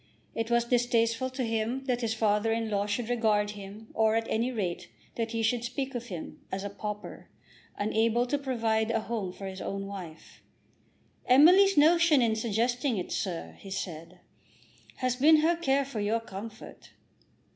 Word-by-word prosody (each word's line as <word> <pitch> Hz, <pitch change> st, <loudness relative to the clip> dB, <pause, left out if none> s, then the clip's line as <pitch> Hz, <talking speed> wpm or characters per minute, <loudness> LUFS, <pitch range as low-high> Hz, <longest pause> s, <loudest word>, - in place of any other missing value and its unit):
It 225 Hz, 0 st, -3 dB
was 235 Hz, 0 st, +2 dB
distasteful 235 Hz, 0 st, +1 dB
to 260 Hz, 0 st, -4 dB
him 230 Hz, +3 st, -1 dB
that 250 Hz, -2 st, 0 dB
his 225 Hz, -2 st, -1 dB
father 215 Hz, 0 st, +1 dB
in 225 Hz, -1 st, -1 dB
law 200 Hz, 0 st, 0 dB
should 220 Hz, +3 st, -2 dB
regard 215 Hz, -4 st, +1 dB
him, 205 Hz, +2 st, -10 dB
or, 220 Hz, 0 st, +2 dB
at 225 Hz, 0 st, +1 dB
any 235 Hz, +3 st, +1 dB
rate, 190 Hz, -8 st, -3 dB, 0.3 s
that 230 Hz, -1 st, -2 dB
he 225 Hz, 0 st, -2 dB
should 230 Hz, +1 st, +1 dB
speak 265 Hz, +3 st, -3 dB
of 240 Hz, -1 st, -4 dB
him, 175 Hz, -6 st, -8 dB
as 190 Hz, +1 st, -3 dB
a 200 Hz, -, -4 dB
pauper, 210 Hz, +1 st, -7 dB, 0.5 s
unable 225 Hz, +3 st, +1 dB
to 285 Hz, +3 st, -1 dB
provide 225 Hz, -5 st, 0 dB
a 225 Hz, -1 st, +1 dB
home 215 Hz, -5 st, -3 dB
for 195 Hz, -, -9 dB
his 190 Hz, -1 st, -6 dB
own 195 Hz, 0 st, -4 dB
wife. 185 Hz, -5 st, -9 dB, 0.9 s
"Emily's 360 Hz, +9 st, +6 dB
notion 325 Hz, 0 st, +5 dB
in 230 Hz, -3 st, +2 dB
suggesting 235 Hz, +3 st, 0 dB
it, 180 Hz, -, -4 dB
sir," 180 Hz, -5 st, -3 dB
he 195 Hz, -, -11 dB
said, 175 Hz, -2 st, -6 dB, 0.7 s
"has 255 Hz, -1 st, -1 dB
been 305 Hz, +3 st, +6 dB
her 335 Hz, +2 st, +3 dB
care 280 Hz, -4 st, +1 dB
for 255 Hz, -5 st, -5 dB
your 210 Hz, +3 st, +1 dB
comfort." 220 Hz, +1 st, -10 dB
225 Hz, 170 wpm, -29 LUFS, 205-245 Hz, 0.9 s, Emily's